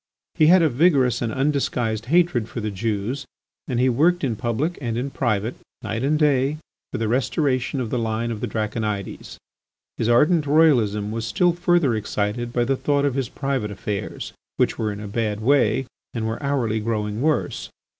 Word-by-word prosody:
He 155 - +4
had 180 +1 +6
a 160 - +4
vigorous 135 -2 +3
and 115 -2 -1
undisguised 125 -5 -1
hatred 155 -8 +2
for - - -5
the 105 -1 -3
Jews, 110 +6 -2 0.4
and 125 -3 -1
he 130 - +4
worked 160 +8 +2
in 125 -5 0
public 125 - -2
and 115 -3 -2
in 135 +3 -2
private, 115 -3 -1 0.3
night 115 +3 -3
and 150 +3 +2
day, 145 -1 +2 0.3
for - - -3
the 115 - -1
restoration 130 +2 0
of 120 -4 -3
the 125 - 0
line 115 +1 -1
of 110 -2 -5
the - - -1
Draconides. 105 -2 -3 0.6
His 115 - 0
ardent 150 +6 +4
royalism 120 -10 +3
was 115 0 -3
still 175 +10 +2
further 175 -6 +2
excited 110 +2 -2
by 120 0 +1
the 135 +3 +1
thought 145 +1 +1
of 140 - +1
his 130 -2 -2
private 135 -6 -2
affairs, 100 0 -5 0.2
which - - +2
were 110 -1 0
in 100 - -6
a 105 - -6
bad 105 0 -2
way 135 +2 +2 0.3
and 115 -1 -2
were 110 +4 -3
hourly 130 -6 0
growing 105 0 -2
worse. 155 +1 0
120 Hz, 185 wpm, -23 LUFS, 110-140 Hz, 0.6 s, had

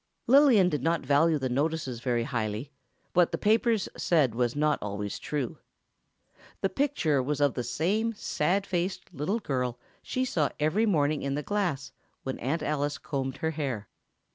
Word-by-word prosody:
Lillian 255 -7 +6
did 150 -6 -1
not 165 0 0
value 150 +4 +4
the 135 -2 -1
notices 140 -1 -1
very 120 -1 0
highly; 115 +1 -3 0.4
what 175 -1 +4
the 165 - -1
paper 225 +3 +3
said 155 - +1
was 120 +1 0
not 150 0 +2
always 100 0 -4
true. 140 -6 -3 1.0
The 195 - +2
picture 225 - +1
was 145 +2 -2
of 145 -2 +3
the 125 - -3
same 205 - 0
sad 190 +1 0
faced 180 0 -3
little 170 - -1
girl 125 - -2 0.2
she 255 0 -1
saw 160 - +1
every 175 +10 +2
morning 150 -5 +2
in 140 0 -1
the 150 - -2
glass 165 -10 -1 0.3
when 130 - -4
Aunt 145 +6 -1
Alice 145 -1 -1
combed 135 -2 -3
her 160 - +1
hair. 135 -9 -3
150 Hz, 165 wpm, -28 LUFS, 130-180 Hz, 1.0 s, Lillian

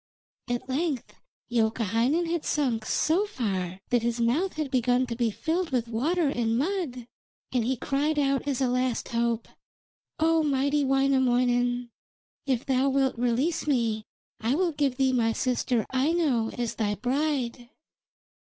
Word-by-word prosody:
At 245 +1 -2
length 275 0 -2 0.4
Youkahainen 230 - +1
had 335 -1 -2
sunk 245 -7 0
so 365 +7 +2
far 190 - -3
that 245 -1 +3
his 235 0 -1
mouth 295 +11 +1
began 250 0 +2
to 240 -2 -4
be 235 -1 +1
filled 330 - -1
with 245 -3 0
water 300 +9 0
and 230 -4 0
mud, 290 -6 -2 0.5
and 250 -3 +1
he 255 +3 0
cried 285 +5 0
out 275 -1 +1
as 275 -2 -1
a 260 - +3
last 250 0 -1
hope: 235 -1 0 0.7
'O 325 0 +3
mighty 285 0 +1
Wainamoinen, 245 -3 +2 0.6
if 260 -2 0
thou 265 +1 +2
wilt 270 -1 +1
release 255 +8 0
me 230 -6 +1 0.4
I 235 +5 +1
will 355 +1 +1
give 285 -4 0
thee 265 -1 +2
my 225 -2 +2
sister 250 -2 0
Aino 265 -4 +1
as 235 -2 -3
thy 205 -2 0
bride.' 250 - -1
255 Hz, 145 wpm, -27 LUFS, 235-285 Hz, 0.7 s, that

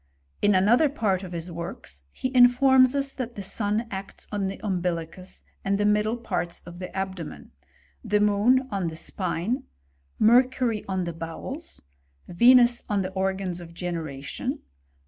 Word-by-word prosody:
In 205 -1 +4
another 235 +11 +4
part 210 -9 0
of 185 -2 -8
his 170 0 -5
works, 170 - -7
he 260 0 -4
informs 255 +1 +6
us 275 -1 -1
that 245 -2 -5
the 200 - -5
sun 210 +3 0
acts 195 0 -7
on 205 -2 -1
the 195 - -5
umbilicus 180 -1 -3 0.2
and 195 0 +1
the 205 - +1
middle 210 +2 +2
parts 175 -7 -3
of 175 0 -10
the 180 - -5
abdomen^^ 190 -4 -6 0.5
the 210 0 +1
moon 210 +6 +3
on 195 -4 -1
the 160 - -5
spine, 185 - -2 0.6
Mercury 245 -1 +3
on 190 -1 -1
the 170 -1 -4
bowels, 165 - -7 0.4
Venus 240 +5 +5
on 205 -2 +1
the 185 - -4
organs 190 -2 -2
of 170 -1 -12
generation. 160 -6 -4
195 Hz, 150 wpm, -26 LUFS, 180-240 Hz, 0.6 s, informs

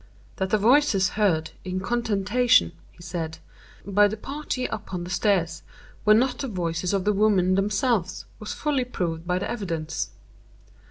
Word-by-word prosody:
"That 190 0 -1
the 215 - +3
voices 220 -4 +4
heard 180 -7 +1
in 185 0 -3
contention," 220 - +2 0.2
he 170 - -16
said, 165 -2 -4 0.5
"by 205 +1 +4
the 215 +2 -4
party 275 +1 -4
upon 180 -2 -4
the 175 - -7
stairs, 180 -5 +1 0.4
were 215 0 +7
not 250 +3 +1
the 275 - -2
voices 175 -4 -2
of 195 -2 0
the 210 - +3
women 195 -3 +3
themselves, 200 0 0
was 215 - -6
fully 285 -4 0
proved 170 -9 -4
by 180 0 +1
the 185 - -2
evidence. 165 -8 -3
195 Hz, 155 wpm, -25 LUFS, 180-220 Hz, 0.5 s, were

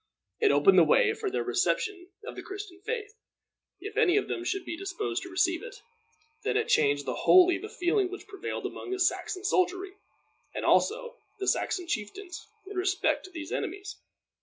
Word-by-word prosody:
It 430 -3 +4
opened 390 - +6
the - - +8
way - - +4
for 435 -2 -3
their - - -1
reception 385 -5 0 0.2
of - - -7
the - - -6
Christian 395 -2 -8
faith, 430 -1 -4 0.7
if 415 +3 -7
any 360 0 +4
of 410 - +1
them 350 - -3
should 380 +1 -2
be - - -4
disposed 390 +3 -3
to 370 - -8
receive 350 -1 +1
it. 485 +2 -9 0.7
Then - - +1
it 445 - 0
changed 145 -1 +3
wholly 360 -1 +5
the 420 - -7
feeling 365 +1 +1
which 385 +1 -8
prevailed 395 -3 -5
among - - -6
the 380 0 -2
Saxon 370 +1 0
soldiery, 380 -1 +1 0.6
and - - -3
also 485 +2 +2 0.2
the 390 -1 -4
Saxon 360 - 0
chieftains, 340 - -5 0.2
in 395 0 -8
respect 375 +1 +1
to - - -10
these 325 -4 -7
enemies. 390 +3 -4
385 Hz, 180 wpm, -29 LUFS, 360-420 Hz, 0.7 s, the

